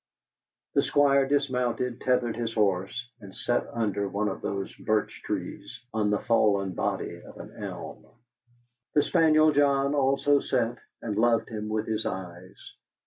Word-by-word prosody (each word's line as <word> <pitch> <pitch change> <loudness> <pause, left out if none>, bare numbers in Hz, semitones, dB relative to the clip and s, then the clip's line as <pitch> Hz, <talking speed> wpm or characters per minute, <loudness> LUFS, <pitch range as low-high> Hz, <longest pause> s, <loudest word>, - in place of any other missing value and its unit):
The - - +4
Squire 140 -1 +3
dismounted, 125 -3 0
tethered 125 -2 +1
his 115 -1 -3
horse, 100 +3 0
and 95 -2 -12
sat 120 - 0
under 105 -3 -1
one 105 +1 -1
of 95 - -6
those 100 -1 -3
birch 110 0 -1
trees, - - -5
on 105 -1 +1
the 105 - +2
fallen 100 -5 +2
body - - -3
of - - -13
an - - -10
elm. - - -7 0.9
The 145 - +5
spaniel 155 -2 +4
John 140 -1 +3
also 140 0 +3
sat 120 -3 -1 0.2
and 105 -3 -3
loved 115 0 +3
him 105 -2 -5
with 110 0 -1
his 110 0 -1
eyes. 90 -1 -7
115 Hz, 145 wpm, -27 LUFS, 105-135 Hz, 0.9 s, The